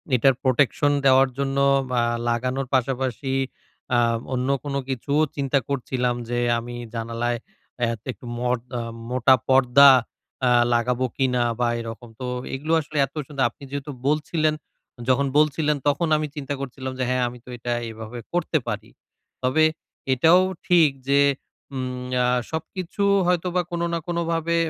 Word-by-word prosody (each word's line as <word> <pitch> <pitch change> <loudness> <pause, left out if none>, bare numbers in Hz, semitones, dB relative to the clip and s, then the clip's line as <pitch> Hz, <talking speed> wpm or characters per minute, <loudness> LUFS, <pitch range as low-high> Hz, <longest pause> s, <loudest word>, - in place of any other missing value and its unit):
এটার 135 +2 +4
প্রোটেকশন 140 +2 +2
দেওয়ার 135 0 +6
জন্য 140 0 -1 0.4
আ - - +3 0.3
লাগানোর 125 +3 -1
পাশা-পাশি 130 0 0 0.6
আ - - +4 0.4
অন্য 130 +1 -1
কোন 145 -1 -4 0.2
কিছুও 140 +3 0
চিন্তা 140 -1 +1
করছিলাম 125 -2 -1
যে, 120 0 0 0.2
আমি 120 +1 -7 0.2
জানালায় 115 +1 -2 0.5
আ - - +5 0.3
একটু 120 +1 -14
মোট 125 0 0 0.2
আ - - -2 0.3
মোটা 130 +1 +5
পর্দা 135 +1 +7 0.6
আ - - +4 0.2
লাগাবো 120 +2 +1
কিনা 125 -2 +1 0.2
বা 120 - +2
এরকম। 115 +1 -7
তো 130 - -4 0.3
এগুলো 150 +5 -2
আসলে 150 0 -7
এত - - -18
সুন্দর। 140 -1 -2
আপনি 130 - -18
যেহেতু 140 +1 -4 0.2
বলছিলেন 155 +1 +1 0.5
যখন 135 +2 +3
বলছিলেন 150 0 +2
তখন 145 +4 +2
আমি 155 0 -2
চিন্তা 145 -1 -4
করছিলাম 130 -1 -5
যে, - - +1
হ্যাঁ, 130 0 +1
আমি 125 - -11
তো - - -13
এটা 120 +1 -4 0.2
এভাবে 110 +2 -8
করতে 175 -2 +1
পারি। 105 -3 -4 0.5
তবে 130 +5 +3 0.5
এটাও 165 +8 +5 0.3
ঠিক 170 -4 +6 0.2
যে, 140 0 +5 0.5
উম 125 -1 -4 0.2
আ - - +2 0.3
সবকিছু 180 +4 -4 0.2
হয়তোবা 180 0 +1
কোনো 170 0 -1
না 170 - 0
কোনো 170 -1 -1
ভাবে 165 0 0
135 Hz, 150 wpm, -23 LUFS, 125-150 Hz, 0.6 s, পর্দা